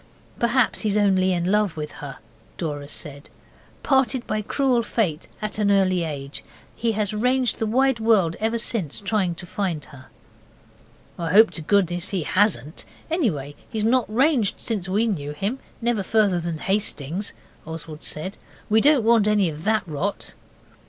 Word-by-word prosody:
'Perhaps 235 +1 +2
he's 210 -2 +1
only 190 -2 +3
in 175 +1 0
love 210 -5 +1
with 150 -1 -4
her,' 140 -2 -8 0.4
Dora 145 -4 -4
said, 145 -1 -7 0.5
'parted 265 -2 +2
by 215 - -1
cruel 255 +2 +1
Fate 195 -8 -1 0.2
at 215 0 -3
an 205 -1 +2
early 185 -3 +3
age, 140 -3 -5 0.3
he 230 -1 0
has 210 0 0
ranged 250 +3 +1
the 225 - 0
wide 260 +2 +2
world 210 -7 +3
ever 225 +2 0
since 215 - -1
trying 195 -4 0
to 175 - -8
find 175 -5 -3
her.' 135 -3 -14 1.1
'I 165 -1 -2
hope 220 +4 +7
to 165 - -5
goodness 175 0 +1
he 185 -5 -1
hasn't 165 - +1 0.3
anyway, 165 - 0 0.2
he's 215 -2 -1
not 245 -1 +2
ranged 250 -3 +2
since 200 -5 -3
we 210 +5 +2
knew 150 -10 -2
him 200 - -3 0.2
never 235 -3 +1
further 200 -2 +2
than 170 -1 -3
Hastings,' 190 -1 -2 0.3
Oswald 160 -1 -7
said. 175 +6 -5 0.3
'We 220 +1 +5
don't 285 -2 +5
want 225 -2 +4
any 205 -4 +3
of 155 +1 -8
that 220 0 +2
rot. 170 +6 -3
200 Hz, 160 wpm, -23 LUFS, 165-225 Hz, 1.1 s, hope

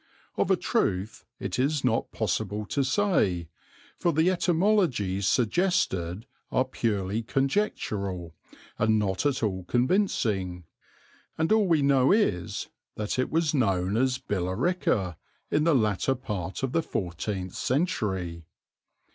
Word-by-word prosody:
Of - - 0
a - - +5
truth 95 +4 -1
it - - -3
is 140 +2 +1
not 120 -2 +1
possible 105 0 -2
to 140 - -1
say, 130 - +1 0.5
for 175 - +2
the 160 +4 +3
etymologies 170 - +1
suggested 110 - +1 0.3
are 130 - +2
purely 105 -4 -1
conjectural 110 - -1 0.5
and 110 +1 +3
not 100 +4 0
at 135 -4 -1
all 95 -4 -1
convincing, 115 - 0 0.7
and 160 +3 0
all 215 -2 +4
we 160 -5 +3
know 135 -2 +4
is 100 - +1 0.3
that 105 +4 -2
it 130 - +1
was 160 -1 +1
known 100 -7 +1
as 130 +2 +2
Billerica 95 - -1 0.3
in 150 - +2
the 165 -3 +4
latter 110 +2 +1
part 105 -6 -5
of 135 - 0
the 165 - +2
fourteenth 95 - -4
century. 95 - -1
110 Hz, 125 wpm, -27 LUFS, 95-150 Hz, 0.7 s, a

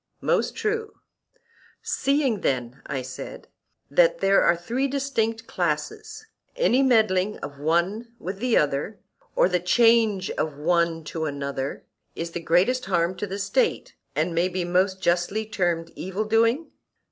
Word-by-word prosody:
Most - - +1
true. 435 0 -2 0.9
Seeing 275 -6 +1
then, 125 0 -2
I 130 -2 -3
said, 130 - -8 0.4
that - - +4
there 195 - +4
are 170 - +4
three 240 +10 -1
distinct 230 -5 -1
classes, 425 - -3 0.3
any 485 - +3
meddling 215 -6 +3
of 140 0 -7
one 175 +10 0
with 190 -1 -6
another, 200 - +1 0.4
or - - +5
the 180 -1 +1
change 220 +1 +3
of 155 -3 -3
one 170 +3 +3
into 165 0 -5
another, 140 -2 -4 0.3
is 165 0 -4
the 170 - -4
greatest 190 +10 +2
harm 175 -2 +1
to 205 - -3
the 195 +1 -4
State, 450 - 0 0.2
and 175 - 0
may 170 +2 +1
be 180 -1 -2
most 185 +2 +1
justly 180 +5 +1
termed 175 -6 -1
evil 190 +4 -3
doing? 230 +8 +2
190 Hz, 140 wpm, -25 LUFS, 170-235 Hz, 0.9 s, or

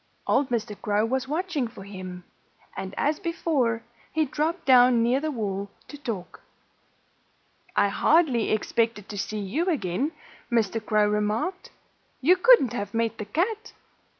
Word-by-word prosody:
Old 280 - +2
Mr. 220 -3 -2
Crow 210 +1 +1
was 260 +2 -1
watching 310 -3 -1
for 225 -4 -11
him. 185 -2 -8 0.5
And 190 0 -6
as 295 +2 +1
before, 270 -9 0 0.3
he 315 0 +1
dropped 315 +5 -2
down 250 -2 +6
near 245 +3 +2
the 310 +2 -2
wall 200 -6 -3 0.2
to - - -8
talk. 230 -11 -6 1.3
"I 200 - +4
hardly 275 0 +3
expected 220 -1 0
to 205 - -6
see 215 +2 -3
you 225 - -2
again," 260 - -1 0.4
Mr. 225 -2 +1
Crow 215 -1 +2
remarked. 210 - -1 0.5
"You 340 +8 +5
couldn't 370 - +5
have 205 +1 -4
met 230 0 0
the 210 - -4
cat." 425 - -2
235 Hz, 145 wpm, -26 LUFS, 210-305 Hz, 1.3 s, down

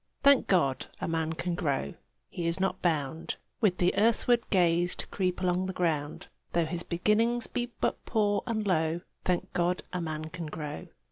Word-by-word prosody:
Thank 280 -1 +6
God, 140 -9 +2
a - - -2
man 160 -1 0
can 175 +2 -2
grow! 140 - -1 0.4
He 170 -1 -2
is 170 +2 0
not 190 0 0
bound 160 -2 -1 0.2
With 205 -6 +2 0.2
earthward 230 +2 +3
gaze 175 -1 +3
to - - -6
creep 185 -2 -1
along 180 0 +1
the 190 - -3
ground: 155 -5 -1 0.3
Though 170 -1 +3
his 170 +2 -3
beginnings 220 +8 +1
be 245 -1 -2
but - - 0
poor 205 -3 +1
and 220 -2 -1
low, 165 -2 +1 0.2
Thank 180 -1 0
God, 175 +1 +1
a 180 - -1
man 155 -1 -4
can 170 -2 -5
grow! 150 -1 -6
175 Hz, 175 wpm, -29 LUFS, 160-195 Hz, 0.4 s, Thank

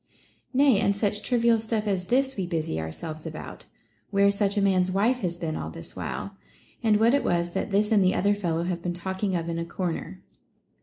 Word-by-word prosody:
Nay, 265 -5 +4
and 200 - +2
such 205 0 0
trivial 235 -1 +3
stuff 220 -1 -1
as 190 -3 -1
this 265 +3 +2
we 190 -3 -2
busy 160 - -2
our 80 0 -4
selves 155 - -7
about, 155 -1 -8 0.2
— - - -41
where 200 0 +4
such 200 0 0
a - - +5
man's 185 -2 +3
wife 215 +7 +2
has 175 -5 -2
been 165 -3 -3
all 80 - -4
this 80 +1 -9
while; 200 - -5 0.5
and 220 -3 +4
what 225 +3 +4
it 280 - +3
was, 175 0 0
that - - -2
this 210 +2 +1
and 205 -3 +5
the 185 - +3
other 200 +2 +3
fellow 170 -5 -1
have 175 -1 -2
been 175 0 -2
talking 190 +2 -2
of 165 -1 -2
in 165 0 -2
a - - -1
corner. 180 +1 -4
195 Hz, 220 wpm, -26 LUFS, 170-210 Hz, 0.5 s, a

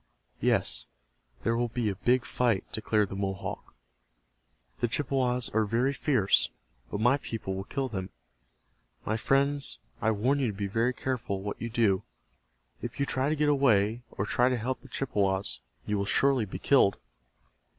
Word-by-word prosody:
"Yes, - - +1 0.6
there 115 - +2
will 120 +1 +1
be 115 -1 -2
a 100 - 0
big 125 +6 +2
fight," 115 -6 +1
declared 110 -2 +1
the - - -5
Mohawk. 95 0 -4 1.0
"The - - +2
Chippewas 125 -1 0
are 110 +1 +2
very 120 +6 +1
fierce, 130 -9 +3 0.4
but 100 - -3
my 125 +5 +4
people 115 -7 -5
will 95 0 -4
kill 135 +2 -2
them. 95 -6 -4 1.0
My 110 - 0
friends, 140 +4 +2 0.2
I 110 - +2
warn 120 +7 +1
you 135 - +1
to 105 - -2
be 100 - -2
very 115 +5 +1
careful 120 -7 -3
what 100 - -5
you 115 - -3
do. 110 -5 +2 0.8
If - - -6
you 140 - +2
try 135 +1 0
to 155 - +1
get 150 0 +1
away, 120 -6 +3
or 95 - -3
try 125 +4 +3
to 125 - 0
help 125 +3 -3
the 135 - -13
Chippewas, 100 - -1 0.3
you 105 -1 0
will 100 - 0
surely 135 +2 +3
be 95 - -6
killed." 115 -9 +4
115 Hz, 170 wpm, -29 LUFS, 100-130 Hz, 1.0 s, my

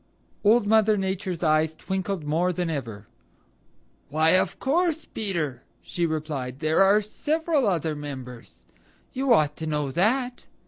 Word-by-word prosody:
Old 220 +1 +4
Mother 215 0 +4
Nature's 190 -2 -3
eyes 155 0 +2
twinkled 190 0 -3
more 165 +5 +1
than 175 -1 -2
ever. 115 -8 -5 1.0
"Why, 155 +3 +3
of 185 0 +2
course, 325 +2 0
Peter," 165 - -2 0.2
she 170 -1 -1
replied. 150 -5 -4
"There 155 +4 +2
are 200 +2 +5
several 305 +5 -1
other 165 -5 0
members. 130 -5 -9 0.5
You 265 0 0
ought 150 -9 +4
to 160 - -5
know 150 -3 -1
that. 245 - 0
175 Hz, 135 wpm, -25 LUFS, 150-215 Hz, 1.0 s, are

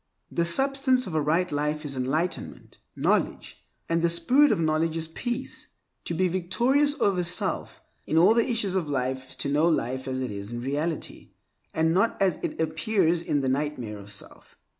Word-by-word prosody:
The 170 - +1
substance 265 +6 +2
of 185 - -6
a 155 - +1
right 165 +5 +1
life 150 +1 -1
is 140 -2 -4
enlightenment 135 +8 -3 0.2
(knowledge), - - -1 0.2
and 165 0 +1
the 170 - +3
spirit 250 - +4
of - - +1
knowledge 160 0 +1
is 160 - 0
peace. 240 +9 -3 0.4
To 170 - -2
be 185 +3 +2
victorious 240 - +2
over 195 -6 +2
self 180 +1 -1 0.2
in 160 - +1
all 185 +6 +7
the 235 +2 +2
issues 220 -6 0
of 180 -6 -1
life 130 -1 -2
is - - -4
to 140 - -2
know 150 +4 +3
life 130 -4 -1
as 130 0 -2
it 130 -3 -3
is 100 +1 -6
in 120 0 -4
reality, 145 +5 -3 0.4
and 160 0 +1
not 195 +6 +1
as 190 -3 +2
it - - -4
appears 165 +2 +1
in 145 -4 0
the 130 - 0
nightmare 130 -6 -2
of 100 +1 -8
self. 100 - -8
165 Hz, 185 wpm, -26 LUFS, 145-185 Hz, 0.4 s, all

